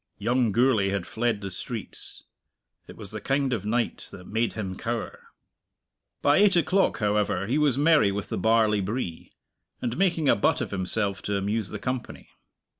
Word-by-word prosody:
Young 120 Hz, -2 st, +1 dB
Gourlay 115 Hz, -3 st, +3 dB
had 100 Hz, -3 st, -2 dB
fled 115 Hz, -2 st, -1 dB
the 100 Hz, -1 st, -5 dB
streets. 110 Hz, +4 st, -6 dB, 0.6 s
It -, -, -12 dB
was 105 Hz, -3 st, -9 dB
the 110 Hz, -, -6 dB
kind 135 Hz, -1 st, 0 dB
of 105 Hz, -3 st, -3 dB
night 115 Hz, +2 st, -1 dB
that 90 Hz, -, -11 dB
made 115 Hz, +3 st, -1 dB
him 95 Hz, -4 st, -4 dB
cower. 115 Hz, +3 st, -5 dB, 1.0 s
By 145 Hz, +1 st, +5 dB
eight 200 Hz, -2 st, +5 dB
o'clock, 185 Hz, -, +2 dB
however, 105 Hz, -3 st, 0 dB
he 130 Hz, +8 st, 0 dB
was 145 Hz, -4 st, +3 dB
merry 150 Hz, -8 st, +4 dB
with 100 Hz, 0 st, -4 dB
the -, -, -2 dB
barley 110 Hz, 0 st, +3 dB
bree, 95 Hz, -4 st, -4 dB, 0.5 s
and 120 Hz, -1 st, -2 dB
making 170 Hz, -6 st, +2 dB
a -, -, +6 dB
butt 100 Hz, -, +2 dB
of -, -, -4 dB
himself 100 Hz, +1 st, -1 dB
to 100 Hz, -1 st, -1 dB
amuse 105 Hz, +1 st, -1 dB
the -, -, -5 dB
company. 125 Hz, -2 st, -5 dB
110 Hz, 175 wpm, -26 LUFS, 100-130 Hz, 1.0 s, a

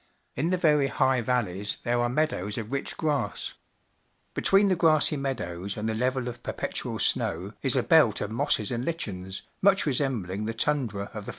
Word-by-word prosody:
In 155 Hz, +6 st, 0 dB
the 185 Hz, -, +1 dB
very 150 Hz, -5 st, +3 dB
high 130 Hz, -2 st, +2 dB
valleys 105 Hz, -5 st, -1 dB
there 120 Hz, 0 st, +1 dB
are 120 Hz, -, +1 dB
meadows 120 Hz, -8 st, -1 dB
of 115 Hz, 0 st, -5 dB
rich 140 Hz, 0 st, -3 dB
grass. 145 Hz, -9 st, -2 dB, 0.8 s
Between 195 Hz, +1 st, +4 dB
the 190 Hz, -, +3 dB
grassy 155 Hz, -3 st, +4 dB
meadows 100 Hz, -9 st, -4 dB
and 105 Hz, +1 st, -2 dB
the 110 Hz, -, 0 dB
level 125 Hz, +2 st, -1 dB
of 120 Hz, -1 st, -7 dB
perpetual -, -, -3 dB
snow, -, -, 0 dB
is -, -, +5 dB
a -, -, +2 dB
belt -, -, +4 dB
of 105 Hz, -, -4 dB
mosses 115 Hz, -3 st, 0 dB
and 120 Hz, 0 st, -2 dB
lichens, 95 Hz, -, -4 dB, 0.2 s
much 195 Hz, 0 st, +4 dB
resem 135 Hz, -, 0 dB
bling 100 Hz, +4 st, -4 dB
the 115 Hz, -, -3 dB
tundra 115 Hz, -7 st, -1 dB
of 105 Hz, -2 st, -7 dB
the -, -, -4 dB
125 Hz, 185 wpm, -27 LUFS, 105-150 Hz, 0.8 s, is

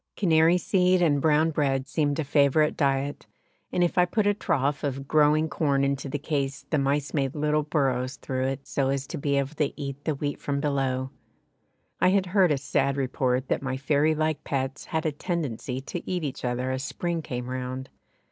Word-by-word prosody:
Canary 165 Hz, -2 st, +4 dB
seed 185 Hz, 0 st, +2 dB
and 150 Hz, -5 st, +3 dB
brown 155 Hz, +1 st, +3 dB
bread 135 Hz, -3 st, 0 dB
seemed 145 Hz, -2 st, 0 dB
a 160 Hz, -, 0 dB
favourite 145 Hz, +1 st, +3 dB
diet, 140 Hz, 0 st, -1 dB, 0.4 s
and 180 Hz, -, +2 dB
if 175 Hz, +1 st, +1 dB
I 180 Hz, -, +6 dB
put 205 Hz, +4 st, 0 dB
a 205 Hz, -, +4 dB
trough 145 Hz, -7 st, -1 dB
of 135 Hz, -1 st, -3 dB
growing 155 Hz, +1 st, +4 dB
corn 140 Hz, -3 st, +1 dB
into 140 Hz, 0 st, -1 dB
the 145 Hz, -, -2 dB
case 140 Hz, -2 st, -2 dB
the 155 Hz, -, +2 dB
mice 140 Hz, +1 st, 0 dB
made 135 Hz, -3 st, 0 dB
little 150 Hz, 0 st, +1 dB
burrows 135 Hz, -4 st, 0 dB
through 130 Hz, -1 st, -3 dB
it 135 Hz, +1 st, -3 dB
so 135 Hz, -1 st, 0 dB
as 135 Hz, 0 st, -1 dB
to -, -, -6 dB
be 140 Hz, 0 st, 0 dB
able 140 Hz, +2 st, -1 dB
to 150 Hz, -2 st, -1 dB
eat 140 Hz, 0 st, -5 dB
the 155 Hz, -, 0 dB
wheat 145 Hz, +1 st, -3 dB
from 140 Hz, -1 st, -1 dB
below. 135 Hz, -3 st, -1 dB, 0.9 s
I -, -, +4 dB
had 190 Hz, 0 st, +2 dB
heard 185 Hz, -2 st, +3 dB
a 145 Hz, -, +2 dB
sad 140 Hz, 0 st, 0 dB
report 130 Hz, -1 st, 0 dB
that -, -, 0 dB
my 130 Hz, -1 st, -2 dB
fairy 145 Hz, +3 st, +2 dB
like 155 Hz, -1 st, -1 dB
pets 135 Hz, -1 st, -3 dB
had 160 Hz, 0 st, -2 dB
a 155 Hz, -, +2 dB
tendency 145 Hz, -, -3 dB
to 165 Hz, +5 st, -5 dB
eat 180 Hz, -2 st, -1 dB
each 140 Hz, -4 st, -4 dB
other 125 Hz, +1 st, -1 dB
as 130 Hz, 0 st, -2 dB
spring 170 Hz, +3 st, -3 dB
came 125 Hz, -4 st, -5 dB
round! 130 Hz, +1 st, -4 dB
140 Hz, 200 wpm, -26 LUFS, 135-155 Hz, 0.9 s, I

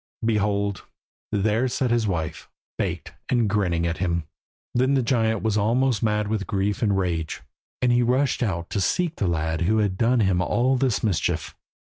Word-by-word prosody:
Behold! 100 Hz, -2 st, 0 dB, 0.5 s
there 110 Hz, +5 st, +1 dB
sat 125 Hz, 0 st, -1 dB
his 120 Hz, -2 st, +2 dB
wife, 80 Hz, -5 st, -3 dB, 0.3 s
baked, -, -, -3 dB, 0.2 s
and 120 Hz, -3 st, +2 dB
grinning 90 Hz, -5 st, +1 dB
at 85 Hz, 0 st, -2 dB
him. 85 Hz, -2 st, 0 dB, 0.5 s
Then 130 Hz, +3 st, +2 dB
the 130 Hz, -, +2 dB
giant 115 Hz, -3 st, +1 dB
was 110 Hz, -1 st, +1 dB
almost 120 Hz, +2 st, +2 dB
mad 105 Hz, -1 st, +1 dB
with 105 Hz, -3 st, -2 dB
grief 100 Hz, +1 st, -1 dB
and 100 Hz, -4 st, +2 dB
rage, 85 Hz, -4 st, -2 dB, 0.4 s
and 125 Hz, -, +4 dB
he 120 Hz, 0 st, +4 dB
rushed 130 Hz, +4 st, +1 dB
out 90 Hz, -7 st, -2 dB
to 100 Hz, -, 0 dB
seek 170 Hz, -, 0 dB
the 100 Hz, -, 0 dB
lad 80 Hz, -1 st, -1 dB
who 105 Hz, +6 st, +2 dB
had 100 Hz, -3 st, 0 dB
done 120 Hz, +1 st, +3 dB
him 95 Hz, -3 st, +2 dB
all 125 Hz, +7 st, +2 dB
this 130 Hz, -3 st, 0 dB
mischief. 100 Hz, -7 st, -1 dB
105 Hz, 180 wpm, -24 LUFS, 95-120 Hz, 0.5 s, and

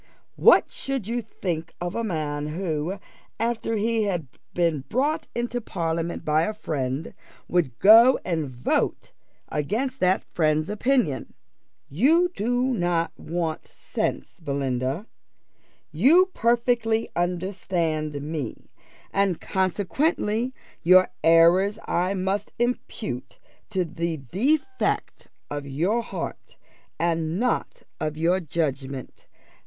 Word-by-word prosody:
What -, -, +6 dB
should 275 Hz, -, -3 dB
you 235 Hz, +3 st, -1 dB
think 170 Hz, -6 st, -4 dB
of 175 Hz, 0 st, -3 dB
a 230 Hz, -, -2 dB
man 150 Hz, -7 st, -2 dB
who, 165 Hz, +2 st, -2 dB, 0.4 s
after 230 Hz, 0 st, -1 dB
he 220 Hz, +1 st, +1 dB
had 175 Hz, -6 st, -1 dB, 0.3 s
been 165 Hz, -6 st, +1 dB
brought 295 Hz, +6 st, 0 dB
into 240 Hz, 0 st, -2 dB
parliament 170 Hz, -4 st, -3 dB
by 155 Hz, +1 st, +3 dB
a 215 Hz, +6 st, -1 dB
friend, 140 Hz, -6 st, -3 dB, 0.3 s
would 155 Hz, -9 st, 0 dB
go 230 Hz, +6 st, +8 dB
and 160 Hz, -6 st, -1 dB
vote 125 Hz, -1 st, -1 dB, 0.4 s
against 235 Hz, -, -2 dB
that 185 Hz, -1 st, +2 dB
friend's 155 Hz, +1 st, +1 dB
opinions? 215 Hz, -, 0 dB, 0.6 s
You 320 Hz, -, +3 dB
do 245 Hz, +4 st, +1 dB
not 175 Hz, -5 st, 0 dB
want 165 Hz, -1 st, -3 dB
sense, -, -, -4 dB
Belinda 135 Hz, -, -2 dB, 0.9 s
you 310 Hz, -, +5 dB
perfectly 235 Hz, -1 st, +2 dB
understand 175 Hz, -4 st, -1 dB
me; 150 Hz, -5 st, -5 dB, 0.4 s
and 195 Hz, -3 st, +2 dB
consequently 210 Hz, -, 0 dB, 0.3 s
your 185 Hz, +2 st, +6 dB
errors 170 Hz, +5 st, +5 dB
I 180 Hz, +3 st, 0 dB
must 190 Hz, +2 st, -2 dB
impute 230 Hz, -, -3 dB, 0.3 s
to 190 Hz, -4 st, 0 dB
the 165 Hz, 0 st, -3 dB
defect 275 Hz, -, -1 dB, 0.2 s
of 145 Hz, -1 st, -4 dB
your 175 Hz, -, +1 dB
heart, 230 Hz, -, -7 dB, 0.4 s
and 165 Hz, 0 st, 0 dB
not 250 Hz, +1 st, -1 dB, 0.2 s
of 155 Hz, -1 st, -2 dB
your 170 Hz, +4 st, +2 dB
judgment. 140 Hz, -5 st, -4 dB
180 Hz, 110 wpm, -25 LUFS, 155-225 Hz, 0.9 s, go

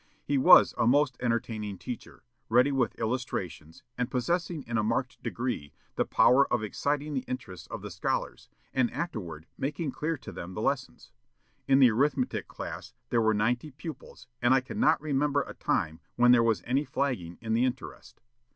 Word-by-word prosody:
He 140 Hz, -1 st, +1 dB
was -, -, +8 dB
a -, -, +3 dB
most 140 Hz, +1 st, +3 dB
entertaining 110 Hz, -4 st, -2 dB
teacher, 120 Hz, +5 st, -8 dB, 0.3 s
ready 125 Hz, +5 st, +4 dB
with 130 Hz, -5 st, 0 dB
illustrations, 90 Hz, -9 st, -4 dB, 0.2 s
and 125 Hz, -, 0 dB
possessing 165 Hz, +4 st, -1 dB
in 120 Hz, -, -5 dB
a -, -, +1 dB
marked 115 Hz, +4 st, -1 dB
degree 120 Hz, -, -3 dB, 0.2 s
the -, -, +1 dB
power 140 Hz, +2 st, +4 dB
of 120 Hz, -3 st, +1 dB
exciting 145 Hz, +7 st, -2 dB
the 130 Hz, -, -1 dB
interest 110 Hz, -9 st, -6 dB
of -, -, -6 dB
the -, -, -6 dB
scholars, -, -, -3 dB, 0.2 s
and 130 Hz, -3 st, +2 dB
afterward 90 Hz, -, -5 dB
making 145 Hz, +1 st, -2 dB
clear 160 Hz, +3 st, -2 dB
to -, -, -10 dB
them 90 Hz, +2 st, -8 dB
the -, -, -4 dB
lessons. 130 Hz, -2 st, -2 dB, 0.6 s
In 135 Hz, -, +5 dB
the 130 Hz, -3 st, +7 dB
arithmetic 130 Hz, +2 st, 0 dB
class -, -, -8 dB, 0.2 s
there 120 Hz, -, +3 dB
were 110 Hz, -1 st, +3 dB
ninety 120 Hz, +7 st, 0 dB
pupils, 150 Hz, +3 st, -10 dB, 0.2 s
and 125 Hz, +2 st, +5 dB
I -, -, +5 dB
cannot 215 Hz, -, +2 dB
remember 145 Hz, -1 st, +1 dB
a -, -, -9 dB
time 80 Hz, 0 st, -1 dB, 0.2 s
when 125 Hz, 0 st, +5 dB
there 125 Hz, -1 st, +6 dB
was 115 Hz, -2 st, +1 dB
any 135 Hz, +4 st, +1 dB
flagging 125 Hz, -, -2 dB
in 110 Hz, -1 st, -3 dB
the 115 Hz, +2 st, +3 dB
interest. 130 Hz, 0 st, -5 dB
125 Hz, 175 wpm, -29 LUFS, 110-140 Hz, 0.6 s, was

